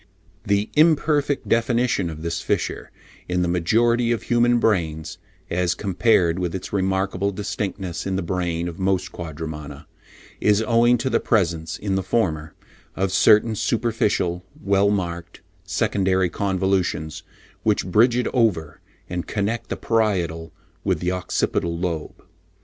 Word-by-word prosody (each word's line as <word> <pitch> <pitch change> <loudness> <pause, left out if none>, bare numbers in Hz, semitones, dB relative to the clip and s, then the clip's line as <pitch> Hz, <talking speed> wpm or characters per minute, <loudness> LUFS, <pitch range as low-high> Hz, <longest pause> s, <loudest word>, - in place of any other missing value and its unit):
The 100 -1 0
imperfect 150 -2 +3
definition 115 -5 +1
of 80 -1 -8
this 85 -1 -2
fissure - - -2 0.4
in 90 0 +1
the - - 0
majority 115 +8 +2
of 115 - -1
human 120 0 +3
brains, 80 -8 0 0.3
as 90 0 +1
compared 90 -3 +2
with 90 -1 -2
its 95 - -6
remarkable 95 0 0
distinctness 100 -3 -4
in 95 - -1
the 95 - -1
brain 85 -1 -2
of 85 +1 -7
most 95 -1 0
Quadrumana, 75 -3 -7 0.5
is 105 +1 +3
owing 120 +1 +4
to 120 +3 -2
the - - +3
presence, 85 -7 0
in 100 -1 -3
the 95 - +1
former, 80 -6 -1 0.4
of 95 0 0
certain 105 +3 +5
superficial, 110 -5 0 0.2
well 100 +1 +2
marked, 85 -4 -3 0.2
secondary 95 -2 +1
convolutions 95 -5 -1 0.4
which - - +1
bridge 115 +6 +4
it 125 - 0
over 90 - 0 0.3
and 90 -2 -4
connect 105 +3 -2
the - - -3
parietal 90 -8 0 0.3
with - - 0
the 90 - -1
occipital 85 -2 -1
lobe. 85 -3 -4
95 Hz, 135 wpm, -23 LUFS, 85-110 Hz, 0.5 s, certain